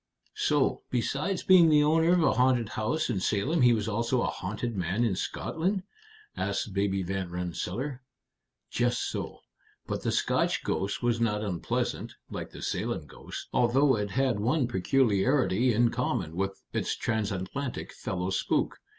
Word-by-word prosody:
"So, - - +2
besides 145 +9 -1
being 180 -3 +7
the 150 -1 +5
owner 160 +3 +4
of 175 -2 +3
a - - +4
haunted 125 -3 +2
house 110 +9 -1
in 110 -6 -1
Salem, 130 - +1
he 125 -1 +6
was 110 -2 0
also 115 +3 0
a - - -1
haunted 105 +5 -4
man 95 +5 0
in 110 -5 +1
Scotland?" 185 - -2 0.5
asked 100 0 -2
Baby 100 -1 0
Van 95 0 -3
Rensselaer. 90 - -4 0.7
"Just 120 0 0
so. - - -5 0.4
But - - -3
the - - -1
Scotch - - +1
ghost 100 +5 -2
was 120 -1 +1
not 105 -2 +1
unpleasant, 90 -5 -2 0.2
like - - -5
the - - -10
Salem - - -2
ghost, - - -9
although 130 +3 +4
it 105 -1 -2
had 130 -1 +1
one 125 +5 +1
peculiarity 120 +2 +2
in 115 +1 +3
common 80 - -2
with 95 +1 -2
its - - -1
transatlantic 110 +4 -3
fellow 90 0 -3
spook. 95 - 0
115 Hz, 150 wpm, -28 LUFS, 100-135 Hz, 0.7 s, being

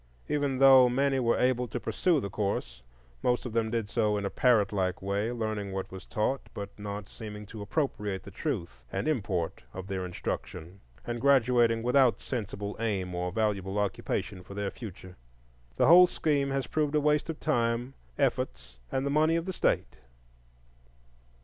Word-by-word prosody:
Even 145 -3 0
though 130 -1 +8
many 135 +2 +1
were 115 -2 +2
able 125 -1 +2
to - - -4
pursue 175 -5 +1
the 100 -6 -5
course, - - -2 0.4
most 125 +1 +1
of 120 - -5
them 115 -1 +1
did 115 -2 -1
so 105 -2 +1
in 100 - -2
a 100 - -2
parrot 110 -6 +3
like 95 -2 0
way, 100 +4 -1
learning 110 -4 -3
what 95 0 -4
was 95 0 -9
taught, 120 +6 -1
but 100 -1 -5
not 100 -1 -5
seeming 105 -2 -8
to 105 +1 -9
appropriate 105 -4 -2
the - - -10
truth - - -4
and - - -2
import 100 - -1
of 95 0 -6
their 95 -1 -3
instruction, 90 0 -5 0.3
and 120 -1 -4
graduating 120 -4 +4
without 125 0 +4
sensible 105 -4 -4
aim 100 -5 -1
or 90 +1 -2
valuable 100 -2 -1
occupation 100 -1 -2
for 100 +2 -11
their 100 -1 -2
future. 95 -5 -10 0.6
The - - +3
whole 180 +3 +9
scheme 145 -5 0
has 135 -1 -1
proved 155 -1 0
a - - +5
waste 150 +1 +1
of 160 - -4
time, 120 -2 0 0.2
efforts, - - -1
and 130 +1 -1
the 140 - 0
money 155 +2 +3
of 165 0 -1
the 190 - -3
state." - - 0
110 Hz, 175 wpm, -29 LUFS, 100-135 Hz, 0.6 s, whole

